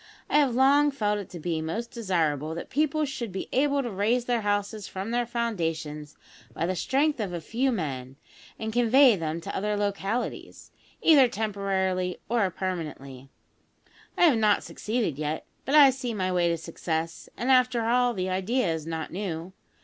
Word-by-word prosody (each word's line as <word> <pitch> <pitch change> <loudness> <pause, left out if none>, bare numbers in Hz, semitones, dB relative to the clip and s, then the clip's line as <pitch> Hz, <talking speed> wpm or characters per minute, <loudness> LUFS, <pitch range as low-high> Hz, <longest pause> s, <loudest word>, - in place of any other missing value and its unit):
I 295 - +5
have 270 -5 +2
long 280 +3 +5
felt 210 -7 -1
it 200 - -8
to 175 - -8
be 160 0 -2
most 220 +10 -4
desirable 160 - -1
that 170 - -7
people 305 +1 +1
should 245 -6 -5
be 190 - -5
able 280 +1 +2
to 240 - -4
raise 220 +5 +1
their 240 -2 0
houses 205 0 -1
from 195 +4 -5
their 240 0 0
foundations 165 -10 -3 0.4
by 165 - -1
the 185 +2 -1
strength 280 - +1
of 200 -5 -3
a 175 - -3
few 245 - 0
men, 135 - -4 0.4
and 220 0 -4
convey 245 +1 +6
them 165 -2 -3
to - - -6
other 210 +1 -1
localities, 205 +3 -3 0.3
either 285 -6 +7
temporarily 195 -4 -1
or 225 -5 +2
permanently. 150 -8 -5 0.9
I - - +3
have 290 -10 +5
not 210 -1 +3
succeeded 210 - -2
yet, 155 +1 -3 0.2
but 280 - +1
I 285 -3 +9
see 250 -3 -4
my 185 -2 -1
way 175 -1 +2
to 170 - 0
success; 165 0 -4
and, 250 +3 0
after 250 -2 +3
all, 245 +1 +2
the 185 0 -2
idea 190 +1 0
is 160 -1 -5
not 160 -1 -4
new. 180 -1 -5
205 Hz, 175 wpm, -27 LUFS, 170-245 Hz, 0.9 s, I